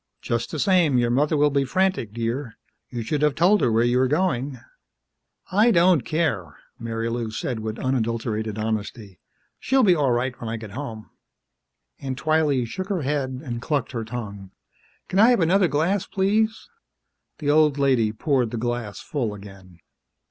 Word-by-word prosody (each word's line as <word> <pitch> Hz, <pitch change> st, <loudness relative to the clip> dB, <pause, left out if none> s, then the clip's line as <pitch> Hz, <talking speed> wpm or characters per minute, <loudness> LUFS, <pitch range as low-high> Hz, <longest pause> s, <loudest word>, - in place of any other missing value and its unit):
"Just 115 Hz, 0 st, -2 dB
the -, -, -5 dB
same, 175 Hz, -9 st, +3 dB
your 120 Hz, -1 st, +2 dB
mother 150 Hz, +5 st, +2 dB
will 145 Hz, 0 st, +3 dB
be 140 Hz, 0 st, +2 dB
frantic, 185 Hz, -, 0 dB
dear. 115 Hz, +2 st, -4 dB, 0.3 s
You 120 Hz, -2 st, -4 dB
should 145 Hz, +6 st, -2 dB
have 150 Hz, -2 st, +2 dB
told 190 Hz, +6 st, +4 dB
her 120 Hz, -, +2 dB
where 115 Hz, +1 st, +3 dB
you 120 Hz, +1 st, +2 dB
were 130 Hz, -, +3 dB
going." 145 Hz, -4 st, -1 dB, 0.9 s
"I 210 Hz, +5 st, +4 dB
don't 175 Hz, -, +4 dB
care," 115 Hz, -, -2 dB, 0.2 s
Marilou 115 Hz, 0 st, -3 dB
said 115 Hz, +1 st, -3 dB
with 110 Hz, +1 st, -5 dB
unadulterated 115 Hz, -4 st, -2 dB
honesty. 110 Hz, -2 st, -4 dB, 0.4 s
"She'll 265 Hz, 0 st, +2 dB
be 190 Hz, -5 st, +6 dB
all 145 Hz, -6 st, +1 dB
right 120 Hz, +2 st, 0 dB
when 115 Hz, -, -4 dB
I 115 Hz, -, -3 dB
get 110 Hz, -2 st, -9 dB
home." 115 Hz, -3 st, -7 dB, 0.9 s
Aunt 130 Hz, -2 st, -4 dB
Twylee 150 Hz, -3 st, +1 dB
shook 185 Hz, -, -6 dB
her 185 Hz, -6 st, -1 dB
head 135 Hz, -2 st, -2 dB
and 120 Hz, -4 st, -5 dB
clucked 140 Hz, -2 st, -1 dB
her 115 Hz, -3 st, -3 dB
tongue. 105 Hz, -4 st, -7 dB, 0.6 s
"Can 190 Hz, -, 0 dB
I 225 Hz, +3 st, +7 dB
have 245 Hz, -, +4 dB
another 180 Hz, +2 st, +3 dB
glass? 170 Hz, +6 st, 0 dB
Please?" 215 Hz, +3 st, 0 dB, 0.7 s
The 145 Hz, -2 st, 0 dB
old 150 Hz, -1 st, +4 dB
lady 130 Hz, -6 st, +2 dB
poured 125 Hz, +1 st, 0 dB
the 120 Hz, -, -5 dB
glass 120 Hz, -3 st, -3 dB
full 120 Hz, -9 st, -3 dB
again. 95 Hz, -3 st, -14 dB
130 Hz, 170 wpm, -23 LUFS, 115-155 Hz, 0.9 s, I